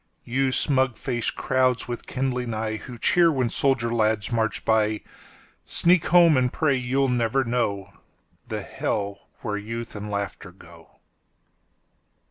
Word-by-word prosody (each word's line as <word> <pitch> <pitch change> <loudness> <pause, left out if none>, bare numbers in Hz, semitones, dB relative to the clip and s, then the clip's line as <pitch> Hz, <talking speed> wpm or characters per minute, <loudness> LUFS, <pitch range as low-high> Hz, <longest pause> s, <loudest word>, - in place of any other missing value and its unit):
….You 130 +2 +1
smug 130 -3 +1
faced 120 -3 -2
crowds 130 -1 +1
with 120 -1 -6
kindling 125 -1 -2
eyeWho 110 +2 -4
cheer 170 +5 +4
when 130 -5 0
soldier 120 -4 +1
lads 110 -1 +1
march 110 -2 -1
by, 110 -1 +2 0.7
Sneak 175 -1 +3
home 170 -2 +6
and 125 -1 +2
pray 145 -3 +1
you'll 130 +2 +1
never 125 +1 +1
knowThe 100 -5 -5
hell 100 -1 -3
where 105 -2 -2
youth 115 +3 -6
and 105 0 -6
laughter 100 -2 -4
go. 85 -2 -17
120 Hz, 125 wpm, -24 LUFS, 110-130 Hz, 0.7 s, home